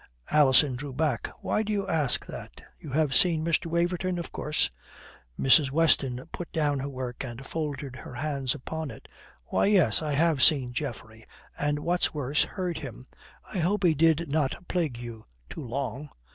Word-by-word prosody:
Alison 140 -2 +5
drew 135 +2 -6
back. 150 +2 0
"Why - - 0
do 215 0 -2
you 200 -2 -1
ask 155 -8 +1
that? - - -9 0.2
You 155 - -9
have 145 0 +1
seen 160 +1 +4
Mr. 165 0 +1
Waverton, 175 +2 0
of 170 - -5
course." 150 0 0 0.7
Mrs. 135 +1 +6
Weston 135 -4 +2
put 175 - -6
down 145 -3 +1
her 140 +2 -3
work 130 -2 -5
and 125 +1 -7
folded 145 -4 -4
her 125 - -9
hands 140 -1 -1
upon 160 +2 -5
it. 110 - -11 0.4
"Why, - - +1
yes, 175 - +4
I 150 -2 -1
have 155 -1 +2
seen 130 -4 +4
Geoffrey; 110 -5 -6 0.3
and 145 0 0
what's 175 +2 0
worse, 145 0 +1
heard 180 -3 -3
him. 130 -3 -8 0.5
I 190 - -1
hope 195 +4 +1
he 170 -3 +5
did 165 +2 +3
not 150 +4 -1
plague 160 -9 -1
you 115 -2 -9 0.2
too - - -6
long." 135 +3 -4
150 Hz, 175 wpm, -28 LUFS, 130-165 Hz, 0.7 s, Mrs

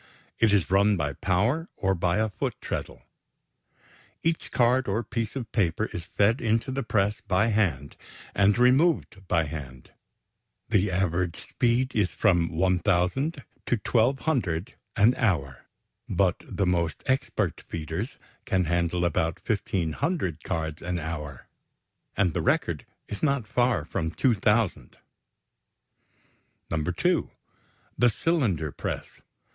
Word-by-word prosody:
It 115 -2 +4
is 100 -3 +2
run 100 +1 +4
by 75 -3 -1
power 110 - 0
or 95 0 +1
by 85 +1 +1
a 110 0 +1
foot - - -3
treadle. - - -5 1.2
Each 165 0 0
card 125 +1 +2
or 105 +4 0
piece 115 +1 -3
of 125 -4 -5
paper 105 0 0
is 85 - -5
fed 105 +6 +2
into 115 +3 +1
the 135 +1 -2
press 105 -3 0
by 100 +4 +3
hand 85 - 0 0.4
and 100 +2 +3
removed 125 - +3
by 85 -2 +2
hand. 70 -4 -8 0.8
The 105 -2 +2
average 90 -2 -1
speed 125 +2 +1
is 100 -4 +2
from 85 0 +2
1,000 90 - +1 0.2
to - - +3
1,200 125 - +1 0.2
an 110 +2 +5
hour, 70 - -1 0.4
but - - +2
the 100 - -1
most 85 -3 0
expert 130 +1 0
feeders 85 - -5 0.3
can 95 -7 +1
handle 85 +1 0
about 80 -1 -1
1,500 95 - -1
cards 80 0 -3
an 90 0 -2
hour, 75 -5 -5 0.7
and 90 -5 +2
the - - -1
record - - 0 0.2
is 100 - -6
not 140 -6 +1
far 120 -8 +1
from 80 0 -2
2,000. 105 0 +1 1.7
(2) 80 -1 0 0.7
The 120 - +6
cylinder 110 - 0
press. - - -6
100 Hz, 125 wpm, -27 LUFS, 85-120 Hz, 1.7 s, The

